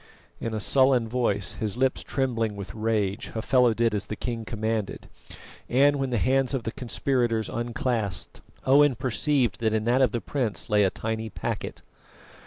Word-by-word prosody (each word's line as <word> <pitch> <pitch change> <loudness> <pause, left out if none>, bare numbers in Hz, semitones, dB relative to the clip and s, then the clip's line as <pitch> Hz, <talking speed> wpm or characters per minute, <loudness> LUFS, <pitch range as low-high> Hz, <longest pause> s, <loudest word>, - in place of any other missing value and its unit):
In 115 -1 -3
a - - -1
sullen 130 +2 +3
voice, 110 -5 0
his 110 +1 -2
lips 130 0 +1
trembling 115 -6 -1
with 100 -2 -7
rage, 110 -2 -1
Hafela 120 +1 +3
did 115 -1 +2
as 100 -1 -2
the 110 - -4
king 115 0 -4
commanded; 110 -2 -3 0.6
and 140 +3 +4
when 135 -1 -1
the 120 - 0
hands 135 +3 +2
of 125 - -3
the 115 - -3
conspirators 120 -2 -1
unclasped, 120 -3 -3 0.2
Owen 140 0 +5
perceived 130 +2 0
that 110 -2 +1
in 110 -1 +1
that 120 +4 +2
of 130 -4 +4
the 120 - -1
prince 120 -6 -3
lay 105 -1 +5
a 95 - +4
tiny 110 +2 -4
packet. - - -5
115 Hz, 170 wpm, -26 LUFS, 110-130 Hz, 0.6 s, Owen